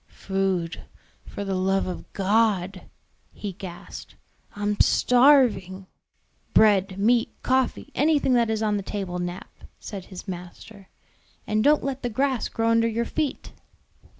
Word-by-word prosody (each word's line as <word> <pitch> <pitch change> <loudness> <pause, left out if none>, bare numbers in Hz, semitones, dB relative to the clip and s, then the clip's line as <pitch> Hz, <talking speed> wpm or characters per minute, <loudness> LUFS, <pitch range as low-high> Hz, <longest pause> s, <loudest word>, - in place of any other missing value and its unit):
"Food, 190 -3 -2 0.5
for 200 - -6
the 195 - -2
love 190 +1 +1
of 180 - -7
God," 195 -2 0 0.4
he 205 - -6
gasped. 185 -2 -10 0.4
"I'm 205 0 -2
starving!" 245 -8 +4 0.7
"Bread, 195 -3 +4
meat, 230 +4 +2
coffee, 260 +2 0
anything 290 -3 +2
that 235 -2 +3
is 220 0 -1
on 210 -1 +1
the - - -3
table, 190 -2 -4
Nap," 175 +1 -6 0.3
said 195 -3 -8
his 190 +1 -10
master; 185 +2 -9 0.6
"and 215 0 0
don't 295 +2 +4
let 275 -1 -3
the 245 - -2
grass 260 +2 -1
grow 225 0 0
under 230 0 +3
your 230 +1 -1
feet." 305 +1 -3
205 Hz, 135 wpm, -24 LUFS, 190-235 Hz, 0.7 s, starving